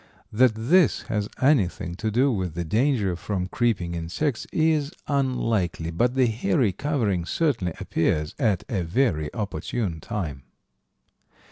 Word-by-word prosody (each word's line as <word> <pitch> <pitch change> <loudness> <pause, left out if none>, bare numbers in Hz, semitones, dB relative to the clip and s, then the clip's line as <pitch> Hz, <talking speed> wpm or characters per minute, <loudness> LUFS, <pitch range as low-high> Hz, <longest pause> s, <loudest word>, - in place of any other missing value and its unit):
That 125 +1 +5
this 140 +9 +3
has 105 -1 -1
anything 95 - +2
to 110 - -1
do 130 +6 +3
with 95 -7 -2
the 85 0 -2
danger 110 - +1
from 90 +1 -3
creeping 95 -6 0
insects 85 - -2
is 155 -2 +2 0.2
unlikely, 115 - 0
but 120 +9 +1
the 130 -1 +4
hairy 120 - +1
covering 110 - -1
certainly 115 - 0
appears 75 0 0
at 105 -9 +1
a 105 -8 -1
very 85 - 0
opportune 100 -2 -3
time. 75 -6 -4
110 Hz, 130 wpm, -25 LUFS, 85-130 Hz, 0.2 s, That